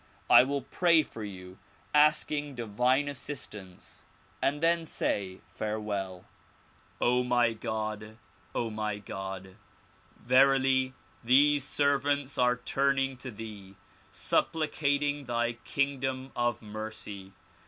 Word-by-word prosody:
I -, -, +10 dB
will 140 Hz, +1 st, -1 dB
pray 165 Hz, +2 st, +3 dB
for 110 Hz, -, -9 dB
you 95 Hz, -2 st, -9 dB, 0.3 s
asking 150 Hz, -1 st, +3 dB
divine 125 Hz, +5 st, +1 dB
assistance 115 Hz, -9 st, -7 dB, 0.3 s
and 145 Hz, +2 st, +1 dB
then 165 Hz, +1 st, +2 dB
say 95 Hz, -11 st, -2 dB
farewell. 100 Hz, -4 st, -3 dB, 0.7 s
O 125 Hz, +1 st, +3 dB
my 120 Hz, -2 st, +2 dB
God! 110 Hz, 0 st, -4 dB, 0.4 s
my 110 Hz, -3 st, -2 dB
God! 95 Hz, -1 st, -7 dB, 0.6 s
verily 130 Hz, +1 st, +3 dB, 0.3 s
these 140 Hz, +4 st, +5 dB
servants 140 Hz, -1 st, +1 dB
are 125 Hz, 0 st, +3 dB
turning 135 Hz, +1 st, +1 dB
to 130 Hz, +1 st, -5 dB
thee, 105 Hz, -4 st, -9 dB, 0.3 s
supplicating 145 Hz, -2 st, 0 dB
thy 120 Hz, -1 st, 0 dB
kingdom 135 Hz, -1 st, -1 dB
of 120 Hz, -1 st, 0 dB
mercy. 105 Hz, -2 st, -7 dB
125 Hz, 100 wpm, -29 LUFS, 105-140 Hz, 0.7 s, I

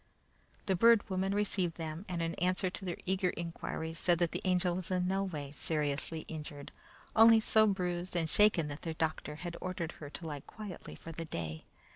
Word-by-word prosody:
The 190 Hz, -, +2 dB
Bird 230 Hz, +3 st, +6 dB
Woman 190 Hz, +1 st, +1 dB
received 190 Hz, -4 st, +1 dB
them, 160 Hz, +2 st, -5 dB
and 170 Hz, -2 st, -1 dB
in 165 Hz, 0 st, -1 dB
answer 185 Hz, 0 st, +1 dB
to 190 Hz, -, -7 dB
their 175 Hz, -, -3 dB
eager 190 Hz, 0 st, +1 dB
inquiries, 165 Hz, -1 st, -4 dB
said 175 Hz, -1 st, +3 dB
that 170 Hz, -1 st, +1 dB
the -, -, -2 dB
Angel 180 Hz, -1 st, +2 dB
was 185 Hz, -1 st, -4 dB
in 180 Hz, -1 st, +1 dB
no 195 Hz, +1 st, +1 dB
way 150 Hz, -7 st, -4 dB
seriously 150 Hz, +1 st, -2 dB
injured, 150 Hz, -3 st, -7 dB, 0.4 s
only 225 Hz, 0 st, +8 dB
so 220 Hz, 0 st, +4 dB
bruised 180 Hz, -2 st, -1 dB
and 165 Hz, -2 st, +1 dB
shaken 195 Hz, -3 st, +4 dB
that 145 Hz, +1 st, -6 dB
their 165 Hz, -1 st, -4 dB
doctor 155 Hz, -2 st, -2 dB
had 170 Hz, +2 st, -5 dB
ordered 175 Hz, -3 st, -3 dB
her 145 Hz, -, -6 dB
to 165 Hz, -, -8 dB
lie 150 Hz, -2 st, -4 dB
quietly 205 Hz, +5 st, -9 dB
for 165 Hz, -, -9 dB
the 165 Hz, +1 st, -5 dB
day. 80 Hz, -, -5 dB
175 Hz, 195 wpm, -33 LUFS, 160-185 Hz, 0.4 s, only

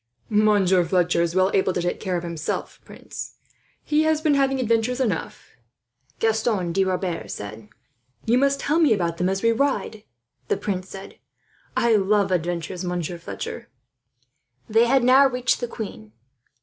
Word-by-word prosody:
"Monsieur 205 Hz, -4 st, +3 dB
Fletcher 175 Hz, 0 st, +1 dB
is 170 Hz, 0 st, -1 dB
well 185 Hz, +1 st, +3 dB
able 190 Hz, -1 st, +2 dB
to 175 Hz, -, -1 dB
take 175 Hz, -, -2 dB
care 185 Hz, -3 st, -2 dB
of 170 Hz, -, -5 dB
himself, 165 Hz, -2 st, -4 dB
prince. -, -, -9 dB, 0.5 s
He 300 Hz, 0 st, +2 dB
has 315 Hz, -1 st, +2 dB
been 310 Hz, -2 st, +2 dB
having 270 Hz, -1 st, +2 dB
adventures 230 Hz, +1 st, +1 dB
enough," 215 Hz, -10 st, -3 dB, 0.7 s
Gaston 220 Hz, -5 st, 0 dB
de 195 Hz, +2 st, +2 dB
Rebers 185 Hz, -2 st, -3 dB
said. 105 Hz, +1 st, -9 dB, 0.6 s
"You 235 Hz, +3 st, +3 dB
must 275 Hz, 0 st, +2 dB
tell 300 Hz, +4 st, +1 dB
me 305 Hz, -8 st, +5 dB
about 170 Hz, -3 st, -2 dB
them 180 Hz, +1 st, +1 dB
as 195 Hz, +2 st, -2 dB
we 230 Hz, -, +4 dB
ride," 230 Hz, -4 st, -1 dB, 0.4 s
the -, -, 0 dB
prince 190 Hz, -2 st, -4 dB
said. 195 Hz, 0 st, -10 dB, 0.6 s
"I 235 Hz, -1 st, +3 dB
love 200 Hz, 0 st, +2 dB
adventures, 175 Hz, +1 st, -2 dB
Monsieur 175 Hz, -1 st, -3 dB
Fletcher." -, -, -7 dB, 1.0 s
They 225 Hz, +2 st, +3 dB
had 265 Hz, 0 st, +3 dB
now 265 Hz, +3 st, +6 dB
reached 250 Hz, -1 st, 0 dB
the 240 Hz, -, -3 dB
queen. 110 Hz, -, -8 dB
200 Hz, 160 wpm, -23 LUFS, 175-245 Hz, 1.0 s, now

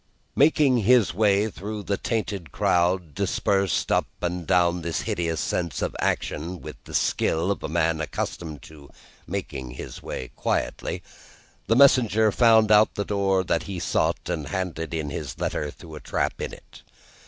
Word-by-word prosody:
Making 145 Hz, -3 st, +4 dB
his 115 Hz, -2 st, +4 dB
way 105 Hz, +1 st, +3 dB
through 105 Hz, 0 st, -6 dB
the 100 Hz, -, 0 dB
tainted 100 Hz, -, -3 dB
crowd, 90 Hz, -2 st, +1 dB
dispersed 100 Hz, -2 st, 0 dB
up -, -, +2 dB
and 90 Hz, -1 st, -3 dB
down 90 Hz, 0 st, +3 dB
this 85 Hz, 0 st, -2 dB
hideous 85 Hz, -2 st, -2 dB
scene 85 Hz, -1 st, -1 dB
of -, -, -2 dB
action, 85 Hz, +4 st, -2 dB
with -, -, -8 dB
the -, -, -7 dB
skill 85 Hz, +5 st, +1 dB
of 100 Hz, -, -3 dB
a -, -, -4 dB
man 80 Hz, 0 st, +1 dB
accustomed 75 Hz, -1 st, -4 dB
to 75 Hz, -3 st, -14 dB, 0.4 s
make 100 Hz, -2 st, -4 dB
his 65 Hz, -3 st, -7 dB
way 65 Hz, -, -6 dB
quietly, -, -, -2 dB, 0.6 s
the 115 Hz, -, +3 dB
messenger 115 Hz, -5 st, +5 dB
found 110 Hz, -1 st, +5 dB
out 105 Hz, +1 st, +5 dB
the 100 Hz, -, -2 dB
door 95 Hz, -2 st, +1 dB, 0.2 s
he 95 Hz, -2 st, -6 dB
sought, -, -, 0 dB
and 75 Hz, -, -3 dB
handed 90 Hz, -4 st, -3 dB
in 75 Hz, -3 st, -3 dB
his -, -, -5 dB
letter 75 Hz, -, -2 dB
through 80 Hz, +2 st, -12 dB
a 75 Hz, -, -7 dB
trap -, -, -2 dB
in -, -, -3 dB
it. -, -, -14 dB
95 Hz, 160 wpm, -25 LUFS, 80-105 Hz, 0.6 s, messenger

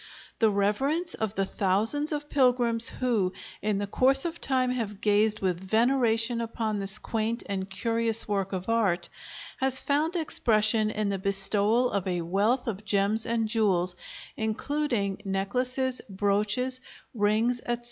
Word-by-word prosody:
The 225 Hz, -, +4 dB
reverence 265 Hz, -, 0 dB
of 220 Hz, -1 st, -3 dB
the 195 Hz, -, 0 dB
thousands 215 Hz, -, +1 dB
of 295 Hz, -1 st, -3 dB
pilgrims 245 Hz, -4 st, +2 dB
who 220 Hz, -8 st, -1 dB, 0.3 s
in 210 Hz, -1 st, 0 dB
the 205 Hz, -, -2 dB
course 265 Hz, -, +2 dB
of 340 Hz, 0 st, -4 dB
time 255 Hz, -2 st, +1 dB
have 220 Hz, -5 st, -4 dB
gazed 210 Hz, +1 st, +2 dB
with 180 Hz, -3 st, -1 dB
veneration 230 Hz, +2 st, +1 dB
upon 225 Hz, -2 st, -3 dB
this 195 Hz, +1 st, +3 dB
quaint 225 Hz, +2 st, -3 dB
and 195 Hz, -1 st, -4 dB
curious 230 Hz, +2 st, 0 dB
work 195 Hz, -2 st, -2 dB
of 185 Hz, -1 st, -4 dB
art, 215 Hz, -6 st, 0 dB, 0.5 s
has 265 Hz, 0 st, +3 dB
found 305 Hz, +5 st, 0 dB
expression 220 Hz, -9 st, +2 dB
in 215 Hz, -1 st, -2 dB
the 195 Hz, -1 st, -2 dB
bestowal 200 Hz, +5 st, +2 dB
of 200 Hz, -2 st, -2 dB
a 180 Hz, -2 st, -1 dB
wealth 205 Hz, +9 st, 0 dB
of 215 Hz, -3 st, -4 dB
gems 210 Hz, +2 st, +1 dB
and 230 Hz, -1 st, 0 dB
jewels, 190 Hz, -5 st, +1 dB, 0.4 s
including 220 Hz, -2 st, -2 dB
necklaces, 250 Hz, +7 st, -1 dB
brooches, 210 Hz, +6 st, 0 dB, 0.3 s
rings, 220 Hz, +3 st, +1 dB
etc. 240 Hz, 0 st, -1 dB
220 Hz, 145 wpm, -27 LUFS, 200-250 Hz, 0.5 s, The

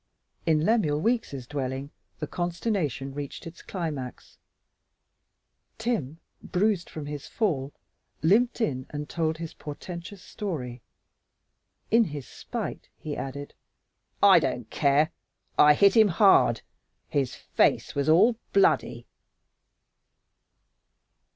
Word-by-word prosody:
In 155 Hz, -1 st, +3 dB
Lemuel 180 Hz, -10 st, +2 dB
Weeks' 195 Hz, -, -1 dB
dwelling 135 Hz, 0 st, -4 dB, 0.3 s
the 155 Hz, -, -3 dB
consternation 170 Hz, -, -2 dB
reached 145 Hz, 0 st, -6 dB
its 165 Hz, +1 st, -10 dB
climax. 150 Hz, -9 st, -6 dB, 1.4 s
Tim, 215 Hz, -, -2 dB, 0.2 s
bruised 195 Hz, -1 st, 0 dB
from 155 Hz, -2 st, -7 dB
his 145 Hz, -1 st, -6 dB
fall, 145 Hz, -, -1 dB, 0.5 s
limped 235 Hz, +9 st, +3 dB
in 130 Hz, -, -1 dB
and 150 Hz, 0 st, -5 dB
told 160 Hz, -1 st, -1 dB
his 165 Hz, -1 st, -6 dB
portentous 175 Hz, +5 st, -8 dB
story. 130 Hz, -, -5 dB, 1.1 s
In 230 Hz, +1 st, +5 dB
his 145 Hz, -6 st, -7 dB
spite, -, -, -6 dB
he 150 Hz, -2 st, -5 dB
added, 140 Hz, +1 st, -6 dB, 0.7 s
"I -, -, +8 dB
don't -, -, -3 dB
care, 145 Hz, +3 st, +3 dB, 0.5 s
I 150 Hz, 0 st, +8 dB
hit 200 Hz, +4 st, +5 dB
him 220 Hz, -2 st, +7 dB
hard. 190 Hz, -, +4 dB, 0.4 s
His 140 Hz, -4 st, -1 dB
face -, -, +1 dB
was 140 Hz, +2 st, 0 dB
all 220 Hz, +9 st, +5 dB, 0.2 s
bloody." 195 Hz, -1 st, +2 dB
155 Hz, 105 wpm, -27 LUFS, 140-195 Hz, 1.4 s, I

